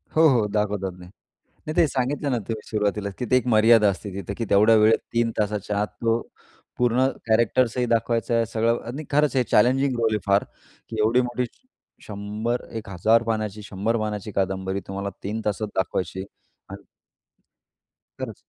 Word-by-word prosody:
हो, 160 +1 +6
हो. 120 -5 +3
दाखवतात. 105 -2 -1
नाही 90 0 -12 0.6
नाही 155 - -3
ते 165 - +6
सांगितलं 135 +2 -1
ना 120 - +1
तुम्ही 110 -2 -5
सुरुवातीलाच 105 -1 -1
तिथे 125 +1 +2
एक 125 - -2
मर्यादा 110 -1 +6
असते. 100 +1 -5
तिथं 100 0 -5
की 115 - -2
तेवढ्या 105 +3 +5
वेळेत 110 +1 +5
3 115 -1 +1
तासाच्या 105 -1 -1
आत 105 - 0 0.2
तो 115 +1 +2 0.6
पूर्ण 125 +2 +3 0.2
कॅरेक्टर्सही 120 +2 +2
दाखवायचा 115 +1 0
आहे. 115 0 +2
सगळं 115 +1 0
आणि 140 +6 -5
खरंच 150 -1 +2
हे 125 - +4
चॅलेंजिंग 130 +4 +3
रोल 110 -1 +2
आहे. 105 - 0
फारकी 100 +2 -3
एवढी 115 +4 +3
मोठी 125 0 -2 0.6
100-1000 110 0 -1
पानाची 110 -2 -2
100 105 +3 -1
पानाची 105 0 -3
कादंबरी 95 0 -1
तुम्हाला 100 +1 -4
3 110 +3 -3
तासात 105 +1 -1
दाखवायची 95 -1 -2
आहे. 95 - -4 0.4
आणि - - -10 1.3
खरंच. - - -5
110 Hz, 155 wpm, -24 LUFS, 105-120 Hz, 1.3 s, हो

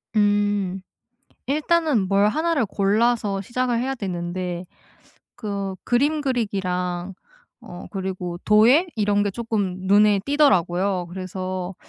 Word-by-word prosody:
음. 205 -2 +1 0.7
일단은 300 - +1
뭘 200 +1 +3
1 330 +8 0
를 265 -8 +1
골라서 205 +1 +1
시작을 240 +3 -1
해야 265 +2 -1
되는데 180 -3 -4 0.7
그 200 -4 -4
그림 290 +6 +1
그리기랑 190 -8 -2 0.5
어 175 - -10
그리고 185 -3 -4
도예 235 +11 +5
이런 205 -1 +2
게 205 - 0
쪼끔 205 -4 -2
눈에 205 +1 +5
띄더라고요. 190 - +2
그래서 185 0 -5
200 Hz, 225 characters per minute, -23 LUFS, 185-240 Hz, 0.7 s, 도예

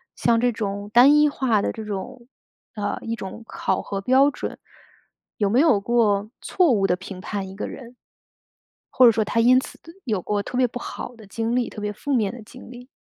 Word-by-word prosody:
像 235 -1 +2
这 245 +1 +2
种 205 -2 -4
单 255 +4 +7
一 300 0 +5
化 255 -7 +1
的 - - -2
这 220 - -7
种， 235 +4 -7 0.5
呃， 205 -1 -2
一 230 0 -3
种 200 +2 -8
考 190 -4 -2
核 195 - -5
标 260 +7 +4
准， - - -6 0.8
有 205 -2 +1
没 235 +5 +3
有 285 -10 +4
过 210 -2 +1
错 360 -6 +2
误 200 -4 +2
地 180 - +2
评 190 0 -9
判 195 +1 -5
一 - - -10
个 205 - -4
人？ 245 -1 -11 0.9
或 255 - +5
者 235 - +8
说 220 0 0
他 230 - -1
因 250 +2 +6
此 - - -9 0.3
有 215 -6 -1
过 205 -1 -1
特 245 - -6
别 255 - +4
不 245 +1 -7
好 245 - -7
的 220 -3 -15
经 225 +3 -2
历， 250 -1 0
特 - - -9
别 210 0 -3
负 285 +7 -6
面 215 -6 +1
的 245 - -9
经 245 +3 -13
历？ 245 0 -12
230 Hz, 230 characters per minute, -23 LUFS, 205-250 Hz, 0.9 s, 者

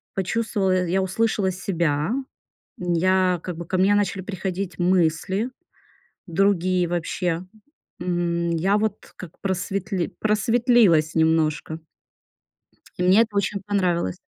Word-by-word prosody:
почувствовала, 190 -2 0
я 190 +2 +1
услышала 190 0 0
себя. 170 -3 -1 0.7
Н 175 -1 -1
я 185 0 +2
как 180 -3 -5
бы 170 - -6
ко 185 - -1
мне 195 +2 +4
начали 200 -2 0
приходить 190 -2 -4
мысли 180 +5 +1 0.8
другие 185 -1 +1
вообще. 175 0 -2 0.6
М, 170 -1 -1
я 190 +5 +2
вот 215 0 -3
как 175 -3 -11
просветли 190 -1 -2
просветлилась 215 - +3
немножко. 160 -1 +1 1.2
И - - 0
мне 190 +5 +6
это 215 -3 -2
очень 200 0 0
понравилось. 180 - 0
185 Hz, 115 wpm, -23 LUFS, 170-200 Hz, 1.2 s, мне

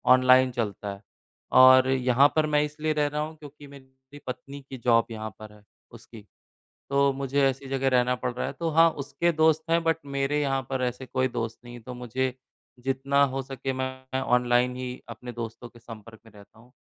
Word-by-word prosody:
Online 130 0 +5
चलता 105 -4 -4
है 100 - -13 0.6
और 130 0 +8
यहाँ 130 +1 +4
पर 155 -1 +3
मैं 150 -1 +2
इसलिए 150 +1 -2
रह 150 -1 +1
रहा 150 +1 -3
हूँ, 155 +1 -5
क्योंकि 145 -1 -13
मेरी 130 0 -16
पत्नी 140 +2 -7
की 130 - -7
जॉब 115 -2 +3
यहाँ 110 -1 -5
पर 110 -1 -11
है 105 -1 -19 0.3
उसकी। 115 -2 -14 0.7
तो 140 0 +3
मुझे 135 +1 -1
ऐसी 135 0 -5
जगह 135 0 0
रहना 125 -1 +2
पड़ 125 0 -3
रहा 125 - -3
है, - - -4
तो 165 -1 -3
हाँ, 165 +1 +5
उसके 155 +4 -2
दोस्त 160 0 +2
हैं 165 0 +3
बट 165 0 +2
मेरे 140 +1 -1
यहाँ 135 -2 0
पर 130 -1 -1
ऐसे 125 +1 -4
कोई 130 0 0
दोस्त 115 -2 -4
नहीं 120 0 -11
है, 120 - -10
तो 125 +2 -9
मुझे 125 +1 -3 0.5
जितना 135 +1 +1
हो 135 - -2
सके 135 0 -5
मैं 130 0 -4
ऑनलाइन 125 0 +2
ही 125 -1 -5 0.2
अपने 120 +1 -8
दोस्तों 120 +1 -7
के 120 - -18
संपर्क 110 -1 -12
में 115 - -17
रहता 105 +1 -18
हूँ। 120 +2 -20
130 Hz, 205 wpm, -26 LUFS, 120-140 Hz, 0.7 s, और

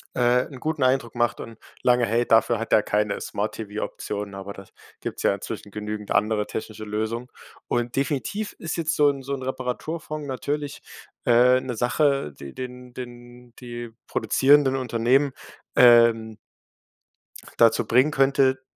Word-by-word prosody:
äh, 125 +1 +3
'n 130 - -9
guten 155 0 -2
Eindruck 130 -2 +1
macht 120 -1 0
und 115 -1 -9 0.3
lange 125 -1 +4
hält, 115 +2 0
dafür 115 +1 +4
hat 115 +1 -3
er 105 - +6
keine 105 -1 -1
Smart 105 +2 -3
TV-Optionen, 105 -1 -5
aber 95 +1 -7
das 95 -1 -13 0.3
gibt's - - -5
ja - - +3
inzwischen - - -7
genügend 105 0 -5
andere 105 0 +1
technische 110 0 -6
Lösung. 110 +3 -3 0.4
Und 120 0 -1
definitiv 150 +10 -2
ist 160 - -4
jetzt 160 -1 0
so 145 -1 +5
'n 140 -1 -3
so 135 +1 -5
'n 130 - -7
Reparaturfond 145 +4 -4
natürlich, 145 +2 -4 0.5
äh, 125 +1 +6
'ne 125 -2 -5
Sache, 135 - +1
die 70 -1 -9
den 125 -1 -8
den 120 -1 -10
die 120 -1 -7 0.2
produzierenden 135 -1 +3
Unternehmen, 130 +2 +2 0.4
ähm 115 -2 +5 1.2
dazu 115 -1 +5
bringen 130 +6 +3
könnte, 135 -1 +3
120 Hz, 145 wpm, -24 LUFS, 110-135 Hz, 1.2 s, er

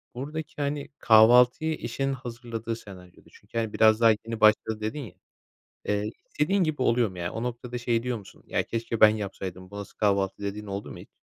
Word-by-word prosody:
buradaki, 150 +3 -6
hani, 145 0 -2
kahvaltıyı 125 +7 +6
eşin 135 +4 -2
hazırladığı 115 -2 -5
senaryoda 90 -5 -14
çünkü, 115 - -11
hani, 110 -2 -1
biraz 110 0 +4
daha 115 - +7
yeni 110 +1 -4
başladı 110 0 +3
dedin 110 +8 -3
ya. 115 -10 -8 0.7
Eee, 105 +1 -1 0.2
istediğin 185 +6 +1
gibi 150 -4 -1
oluyor 120 -2 +3
mu 90 - -11
ya? 85 0 -3
O 115 - -4
noktada 125 0 -4
şey 120 -1 0
diyor 125 -2 -2
musun, 100 - -15
ya - - 0
keşke 115 0 -4
ben 110 - +10
yapsaydım 95 -3 -5
bu 100 - -9
nasıl 100 - -8
kahvaltı 100 -2 +1
dediğin 100 +1 -4
oldu 100 0 -5
mu - - -10
hiç? - - -12
115 Hz, 190 wpm, -27 LUFS, 105-125 Hz, 0.7 s, ben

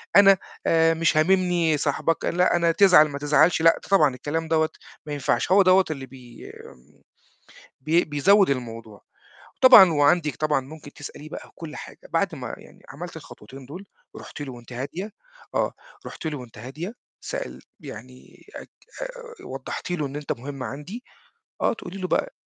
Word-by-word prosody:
أنا 195 -1 +8 0.3
آآ 165 0 +4
مش 165 -1 +1
هاممني 175 -2 +2
صاحبك 150 +3 -1
لأ 180 +1 +2
أنا 170 -1 +3
تزعل 180 -3 +6
ما 140 - -6
تزعلش 155 +3 +3
لأ 165 0 +5
طبعًا 150 -10 +4
الكلام 160 +5 -3
دوّة 160 0 +2 0.4
ما 150 - -5
ينفعش 140 +1 -1
هو 200 - +7
دوّة 185 0 +5
اللي 135 -3 -5
بي 125 -2 -13 1.3
بي 160 +6 +2
بيزوّد 185 +6 +3
الموضوع، 115 -5 -5 0.6
وطبعًا 245 -9 +9
وعندِك 150 +1 +2
طبعًا 155 -2 +1
ممكن 145 +2 -12
تسأليه 145 +1 -10
بقى - - -9
كُل 155 -3 -9
حاجة، - - -10
بعد - - 0
ما - - -6
يعني - - -18
عملتِ - - -8
الخطوتين 130 +5 -12
دول، 180 +9 -10 0.3
رُحتِ - - -10
له 135 -3 -6
وأنتِ 120 0 -12
هادية 165 - -5 0.4
آه، - - 0 0.3
رحتِ - - -9
له 150 -2 -3
وأنتِ 120 -4 -12
هادية 150 - -7 0.3
سألتِ 65 +1 -6 0.2
يعني 125 +4 -12
أك - - -9 0.3
آآ - - -9
وضّحتِ 135 +6 -6
له 165 -4 -1
إن 140 +1 -7
أنت 150 -1 -5
مهم 135 +2 -8
عندي، 150 - -7 0.6
آه، - - +2
تقُولي 195 -3 -9
له 185 - -2
بقى، - - -1
155 Hz, 160 wpm, -24 LUFS, 135-180 Hz, 1.3 s, وطبعًا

